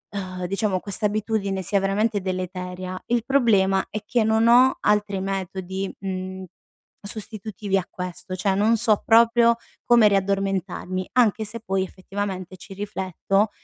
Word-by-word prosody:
uhm, 185 -2 -4
diciamo 195 -1 0
questa 205 +2 0
abitudine 205 -2 -1
sia 200 +3 +1
veramente 205 +2 0
deleteria, 185 0 -4
il 235 -1 +1
problema 200 -8 +3
è 215 - -4
che 235 -2 +1
non 220 +1 +3
ho 250 +2 +6
altri 205 -2 +1
metodi, 190 0 -4
mhmm, 190 0 -5 0.6
sostitutivi 210 -1 -3
a 185 - -1
questo; 180 0 -7
cioè 190 +1 0
non 220 +3 +3
so 215 -3 +3
proprio 235 +1 +5 0.3
come 235 -3 +6
riaddormentarmi, 195 -1 -1
anche 225 -3 +3
se 230 +3 -6
poi 190 -3 -1
effettivamente 190 -1 -5
ci 195 +2 -11
rifletto 195 +1 -1
195 Hz, 135 wpm, -23 LUFS, 190-215 Hz, 0.6 s, ho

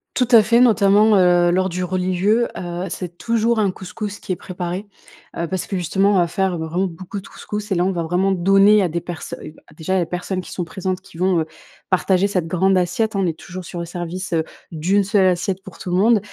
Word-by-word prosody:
Tout 250 - +2
à 230 -2 +9
fait, 230 +3 +3
notamment, 215 -2 +5
heu, 175 -2 +4
lors 185 +1 +1
du 180 +1 -3
religieux, 185 +5 +1
heu, 175 +1 -4
c'est 175 -2 -6
toujours 230 0 +1
un 205 -2 +2
couscous 195 +2 -6
qui - - -6
est 185 - +1
préparé, 180 +2 -5 0.5
heu, 170 - -2
parce 185 +1 -3
que 195 - -2
justement 195 +3 +2
on - - +3
va 175 - +4
faire 190 0 -1
vraiment 165 +4 -1
beaucoup 185 +4 -7
de - - -14
couscous 210 0 -7
et - - +2
là 175 +1 +2
on 190 - +1
va 175 -2 -2
vraiment 180 +4 +1
donner 195 +3 +5
à 185 - +2
des 170 +2 -2
personnes 170 -2 -7 0.2
déjà, 185 +3 -1
les 170 - -1
personnes 180 +2 -3
qui - - -12
sont 180 - -3
présentes, 185 +2 -4
qui 190 -3 -16
vont, 180 -2 +2
heu, - - -2 0.5
partager, 185 +1 +2
cette 180 -5 -1
grande 190 +3 +2
assiette 200 +5 -1
on 195 -2 +1
est 160 -1 -3
toujours 185 +1 -8
sur 175 - -8
le 170 - -3
service, 175 +2 -5
heu, 160 -1 +2 0.3
d'1 180 +5 +1
seule 195 -1 +3
assiette 185 +1 0
pour 190 -3 -12
tout 180 - -6
le 180 - +2
monde 220 +3 +4
185 Hz, 230 wpm, -20 LUFS, 175-200 Hz, 0.5 s, à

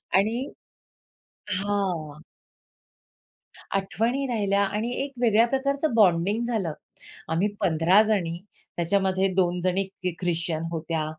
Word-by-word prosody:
आणि 225 +7 +1 1.1
हां. 185 -7 -2 1.5
आठवणी 225 +8 0
राहिल्या 200 -5 +1
आणि 210 +4 -2
एक 280 - -8
वेगळ्या 230 -1 +4
प्रकारचं 275 +1 0
बॉन्डिंग 200 +1 +3
झालं. 215 -9 -1 0.6
आम्ही 175 +6 +2
15 170 +5 +4
जणी 190 -6 0 0.4
त्याच्यामध्ये 190 +2 +1
2 180 -1 +1
जणी 185 +2 +1 0.4
ख्रिश्चन 170 -2 -1
होत्या, 165 -1 -2
195 Hz, 95 wpm, -25 LUFS, 170-225 Hz, 1.5 s, वेगळ्या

